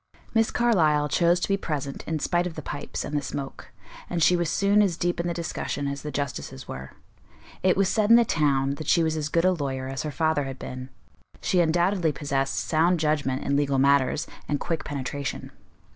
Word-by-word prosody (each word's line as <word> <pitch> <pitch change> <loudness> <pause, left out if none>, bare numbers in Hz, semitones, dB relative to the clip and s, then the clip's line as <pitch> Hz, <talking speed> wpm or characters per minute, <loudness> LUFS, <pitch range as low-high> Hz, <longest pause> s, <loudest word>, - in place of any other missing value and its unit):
Miss 225 -1 +3
Carlyle 160 -11 +3
chose 175 +2 +3
to - - 0
be 195 - +1
present 140 -6 -4
in 160 - -1
spite 175 +3 0
of 165 - -8
the 155 - -6
pipes 145 +1 -5
and 150 - -4
the 145 - +1
smoke, 135 0 -6 0.4
and 170 -2 0
she 180 - +5
was 175 -2 0
soon 200 +3 +3
as 185 -5 +1
deep 175 -1 -1
in 170 - -1
the - - 0
discussion 165 -3 -3
as 140 0 -4
the 150 - -5
justices 140 - -5
were. 65 +1 -8 0.7
It 185 0 +3
was 195 -1 +3
said 215 +1 +1
in 230 - +9
the 235 0 +6
town, 140 -6 +1
that 155 - -7
she 170 - +4
was 160 -1 0
as 155 -1 -2
good 170 +2 +2
a 185 - +5
lawyer 135 -6 -3
as 135 -1 -3
her 155 - -3
father 155 -1 0
had 135 -1 -6
been; 130 +1 -7 0.5
she 185 - +1
undoubtedly 175 +1 +2
possessed 135 -1 -1
sound 170 +2 +2
judgment 150 -4 0
in 140 - 0
legal 140 -1 +1
matters, 140 +1 +3 0.2
and 145 - -1
quick 165 -2 -2
penetration. 140 0 -4
155 Hz, 210 wpm, -26 LUFS, 140-175 Hz, 0.7 s, in